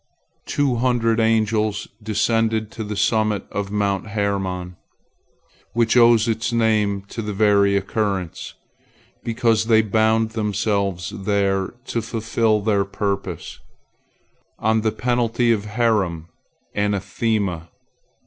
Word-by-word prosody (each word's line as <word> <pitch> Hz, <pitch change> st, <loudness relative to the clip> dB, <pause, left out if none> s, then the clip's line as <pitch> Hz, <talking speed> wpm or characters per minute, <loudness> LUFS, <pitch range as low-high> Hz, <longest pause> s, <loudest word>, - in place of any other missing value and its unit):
Two 140 Hz, -4 st, +1 dB
hundred 115 Hz, -2 st, +1 dB
angels 110 Hz, -1 st, +1 dB
descended 110 Hz, 0 st, 0 dB
to 110 Hz, -, -6 dB
the 105 Hz, 0 st, -5 dB
summit 110 Hz, -1 st, +1 dB
of 100 Hz, -1 st, -3 dB
Mount 100 Hz, -1 st, -1 dB
Hermon, 95 Hz, -4 st, -2 dB, 1.0 s
which 115 Hz, 0 st, +2 dB
owes 120 Hz, -2 st, +5 dB
its 115 Hz, +1 st, -1 dB
name 110 Hz, -4 st, +1 dB
to 105 Hz, +3 st, -7 dB
this 105 Hz, -2 st, -4 dB
very 100 Hz, -1 st, +4 dB
occurrence, 100 Hz, -3 st, -3 dB, 0.7 s
because 115 Hz, -1 st, +1 dB
they 110 Hz, -1 st, +4 dB
bound 110 Hz, +1 st, +2 dB
themselves 100 Hz, -4 st, -1 dB
there 100 Hz, 0 st, 0 dB
to 115 Hz, -, -2 dB
fulfil 110 Hz, -1 st, 0 dB
their 100 Hz, -1 st, +2 dB
purpose, 100 Hz, -3 st, -4 dB, 1.0 s
on 110 Hz, 0 st, +1 dB
the 110 Hz, 0 st, +1 dB
penalty 120 Hz, -1 st, +1 dB
of 105 Hz, -2 st, 0 dB
Herem, 105 Hz, -7 st, 0 dB, 0.4 s
anathema. 100 Hz, -3 st, -1 dB
110 Hz, 110 wpm, -21 LUFS, 100-115 Hz, 1.0 s, owes